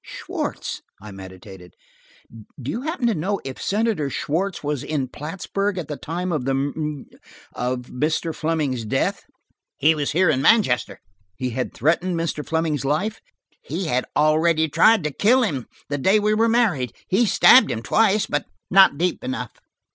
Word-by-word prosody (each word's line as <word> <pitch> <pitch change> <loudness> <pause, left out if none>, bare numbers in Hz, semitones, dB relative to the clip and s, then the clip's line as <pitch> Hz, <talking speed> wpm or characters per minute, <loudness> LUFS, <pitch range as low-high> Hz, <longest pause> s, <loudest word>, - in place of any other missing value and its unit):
"Schwartz?" - - -5 0.2
I 105 +1 -10
meditated. 95 -1 -12 0.8
"Do 130 +1 -4
you 235 - -4
happen 310 -3 -3
to 235 - +3
know 195 +4 -2
if 135 -1 -7
Senator 205 -8 0
Schwartz 175 +7 -2
was 145 -2 -2
in 145 -4 -2
Plattsburg 195 +7 -3
at 165 -4 -5
the 150 - -3
time 175 +5 -4
of 155 -6 -1
the 135 0 0
mur–of 140 -3 -5
Mr. 155 +6 -2
Fleming's 155 -7 -1
death?" 110 - -1 0.5
"He 155 +3 +4
was 145 -2 -2
here 175 0 +3
in 130 -3 0
Manchester." 140 - +2 0.4
"He 125 +5 -3
had 125 +2 -4
threatened 170 +5 +1
Mr. 160 -2 -2
Fleming's 160 -3 -1
life?" 185 +11 -1 0.4
"He 195 - -4
had 130 -5 0
already 160 +1 +3
tried 220 +6 +4
to 150 - -1
kill 245 - +3
him, 140 - -2 0.2
the 145 0 -3
day 195 +10 +4
we 210 +1 +1
were 225 +2 +2
married. 190 - +1
He 220 +5 +2
stabbed 255 +5 +6
him 115 - -3
twice, 215 - +2
but 145 - -2 0.3
not 190 -6 +6
deep 175 +2 -1
enough." 260 +1 -4
155 Hz, 160 wpm, -22 LUFS, 135-195 Hz, 0.8 s, stabbed